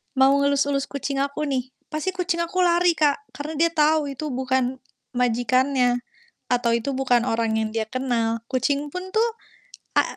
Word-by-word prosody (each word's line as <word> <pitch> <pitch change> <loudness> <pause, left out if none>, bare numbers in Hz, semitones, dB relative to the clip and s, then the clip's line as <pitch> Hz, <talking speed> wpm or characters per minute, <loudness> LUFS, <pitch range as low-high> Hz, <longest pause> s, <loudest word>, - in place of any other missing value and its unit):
Mau 265 0 +5
ngelus-elus 280 0 +1
kucing 280 0 -3
aku 280 +2 -1
nih, 260 -1 -2 0.2
pasti 310 +5 -1
kucing 355 -3 -1
aku 340 +2 -3
lari 350 0 +4
Kak, 285 -2 +1
karena 300 +2 -5
dia 335 +2 +3
tahu 305 -2 +2
itu 300 +3 -5
bukan 260 0 0 0.4
majikannya, 250 +1 +2 0.5
atau 245 -1 +2
itu 235 +4 -1
bukan 250 -3 +2
orang 225 -1 0
yang 220 0 0
dia 220 -1 -1
kenal. 230 -2 -1
Kucing 280 +3 0
pun 365 +1 -6
tuh 450 +2 +3 0.7
a - - +7
275 Hz, 160 wpm, -24 LUFS, 245-305 Hz, 0.7 s, a